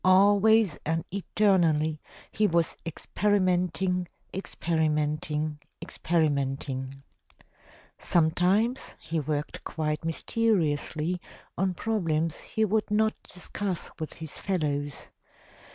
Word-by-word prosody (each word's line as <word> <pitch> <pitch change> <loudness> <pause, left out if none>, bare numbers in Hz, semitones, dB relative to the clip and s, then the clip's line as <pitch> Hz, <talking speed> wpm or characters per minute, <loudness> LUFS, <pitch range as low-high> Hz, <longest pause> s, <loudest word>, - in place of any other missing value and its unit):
Always 200 0 +5
and 165 +1 -1
eternally 170 -6 +2 0.3
he 215 -1 +2
was 170 -2 +1
experimenting, 180 0 +1 0.3
experimenting, 155 -4 -1 0.2
experimenting. 135 -4 -1 1.0
Sometimes 180 +9 +2
he 165 0 -2
worked 150 0 -3
quite 150 -1 -2
mysteriously 165 -2 0 0.3
on 190 0 0
problems 165 -7 0
he 220 - 0
would 215 +1 0
not 220 +1 +3
discuss 185 0 -5
with 155 - -4
his 160 -2 -7
fellows. 145 -6 -2
170 Hz, 85 wpm, -28 LUFS, 155-195 Hz, 1.0 s, Always